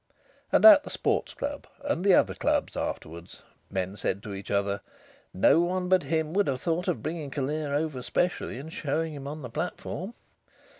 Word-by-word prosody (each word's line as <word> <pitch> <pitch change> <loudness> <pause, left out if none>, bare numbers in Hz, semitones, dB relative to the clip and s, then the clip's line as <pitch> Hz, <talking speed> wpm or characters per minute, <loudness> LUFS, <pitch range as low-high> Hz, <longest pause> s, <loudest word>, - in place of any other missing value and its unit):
And - - +4
at 305 -3 +10
the - - -8
Sports - - -1
Club 285 0 -4 0.2
and 285 -11 -1
the 195 -2 +6
other - - +3
clubs - - 0
afterwards, 85 +3 -6 0.3
men 95 0 -2
said 100 -1 -2
to 105 -3 -6
each 95 0 -8
other: 100 0 0 0.5
"No 95 - +4
one 180 +1 0
but 185 -1 +5
him 160 +2 -1
would 200 +1 +2
have 130 -2 -1
thought 170 +1 -1
of 110 - -1
bringing 155 -2 -4
Callear 145 +2 -2
over 150 -4 -1
specially 175 -1 -1
and 155 +5 -8
showing 155 +2 -2
him 140 -1 -7
on 150 +1 -6
the 125 - -6
platform.... 180 - -4
155 Hz, 185 wpm, -28 LUFS, 125-180 Hz, 0.5 s, at